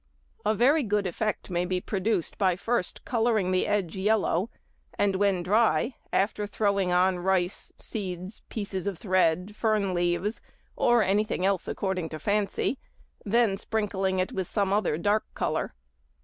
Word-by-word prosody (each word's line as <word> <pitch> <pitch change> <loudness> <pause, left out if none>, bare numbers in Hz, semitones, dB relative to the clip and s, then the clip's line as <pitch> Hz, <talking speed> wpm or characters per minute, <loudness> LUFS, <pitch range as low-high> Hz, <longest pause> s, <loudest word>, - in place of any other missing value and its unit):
A 215 +1 +2
very 275 +8 +4
good 210 -4 0
effect 205 +2 -2
may 175 0 +1
be 180 0 -1
produced 195 -1 -1
by 185 -3 +3
first 225 0 -2
colouring 225 -5 +1
the 185 - +1
edge 205 -5 0
yellow, 210 +1 +1 0.5
and 200 -1 +2
when 190 -2 +2
dry, 225 +6 +2 0.2
after 205 +1 0
throwing 200 -3 +1
on 180 0 +3
rice, 180 0 0
seeds, 185 -1 -5
pieces 200 -3 -4
of 195 -4 -2
thread, 185 +1 +1
fern 215 -4 +1
leaves, 175 +4 0 0.3
or 240 -2 +4
anything 200 -1 +1
else 195 -2 +1
according 185 -4 -2
to 155 - -5
fancy, 205 - 0 0.5
then 215 -2 +2
sprinkling 190 -4 0
with 190 -2 -2
some 200 -2 +1
other 205 -7 +1
dark 205 +5 +1
colour. - - -2
195 Hz, 145 wpm, -27 LUFS, 185-215 Hz, 0.5 s, very